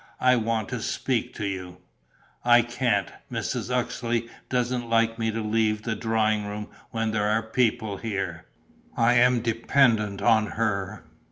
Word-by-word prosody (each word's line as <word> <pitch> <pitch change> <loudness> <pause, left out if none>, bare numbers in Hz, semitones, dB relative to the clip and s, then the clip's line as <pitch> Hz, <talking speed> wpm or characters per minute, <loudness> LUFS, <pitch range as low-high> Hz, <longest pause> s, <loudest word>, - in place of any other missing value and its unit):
I 125 0 +5
want 115 -2 -1
to - - -4
speak - - -2
to 105 - -3
you...." 90 -2 -5 0.7
"I 120 0 +6
can't: 120 +1 0 0.2
Mrs. - - -3
Uxeley 120 -2 -1 0.2
doesn't 125 -1 -1
like 115 0 +2
me 115 0 0
to 110 0 -2
leave 110 0 +1
the 115 -1 -2
drawing 110 -2 0
room 105 +1 -6 0.2
when 110 -1 -1
there 105 -1 0
are 110 +1 +1
people 110 -3 0
here. 95 -6 -4 0.5
I 115 +1 +4
am 125 0 +4
dependent 115 -3 +2
on 110 0 +3
her." 100 -3 -1
115 Hz, 150 wpm, -26 LUFS, 105-120 Hz, 0.7 s, I